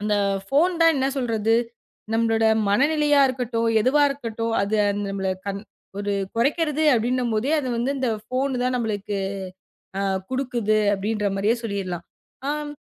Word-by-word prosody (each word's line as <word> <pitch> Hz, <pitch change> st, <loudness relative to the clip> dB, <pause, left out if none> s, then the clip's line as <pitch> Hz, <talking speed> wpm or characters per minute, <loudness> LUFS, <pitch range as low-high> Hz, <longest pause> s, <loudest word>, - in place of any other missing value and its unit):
அந்தப் 200 Hz, -2 st, 0 dB
போன் 340 Hz, +6 st, +3 dB
தான் 330 Hz, 0 st, +6 dB
என்ன 265 Hz, 0 st, +1 dB
சொல்றது. 225 Hz, -3 st, +1 dB, 0.6 s
நம்மளோட 225 Hz, 0 st, +2 dB, 0.3 s
மன 255 Hz, +8 st, +4 dB
நிலையா 295 Hz, -2 st, +3 dB
இருக்கட்டும், 235 Hz, -3 st, -1 dB
எதுவா 290 Hz, +4 st, +3 dB
இருக்கட்டும் 230 Hz, -4 st, -3 dB
அது 210 Hz, +2 st, 0 dB, 0.3 s
நம்மள 195 Hz, -1 st, -2 dB, 0.7 s
ஒரு 205 Hz, 0 st, -2 dB, 0.2 s
குறைக்கிறது 300 Hz, +5 st, +1 dB
அப்படின்னும் 240 Hz, +1 st, 0 dB
போதே, 255 Hz, +8 st, 0 dB
அது 260 Hz, -, -4 dB
வந்து 260 Hz, +4 st, 0 dB
இந்த 255 Hz, -3 st, 0 dB, 0.2 s
ஃபோன் 255 Hz, 0 st, -1 dB
தான் 255 Hz, 0 st, +1 dB
நம்மளுக்கு 205 Hz, -3 st, -2 dB, 0.8 s
அ -, -, 0 dB, 0.3 s
குடுக்குது 240 Hz, -5 st, 0 dB, 0.2 s
அப்படின்ற 210 Hz, +1 st, -1 dB
மாரியே 215 Hz, +5 st, +2 dB
சொல்லிரலாம். 190 Hz, -5 st, -4 dB, 0.4 s
ஆம் 295 Hz, 0 st, -3 dB
230 Hz, 135 wpm, -23 LUFS, 210-270 Hz, 0.8 s, தான்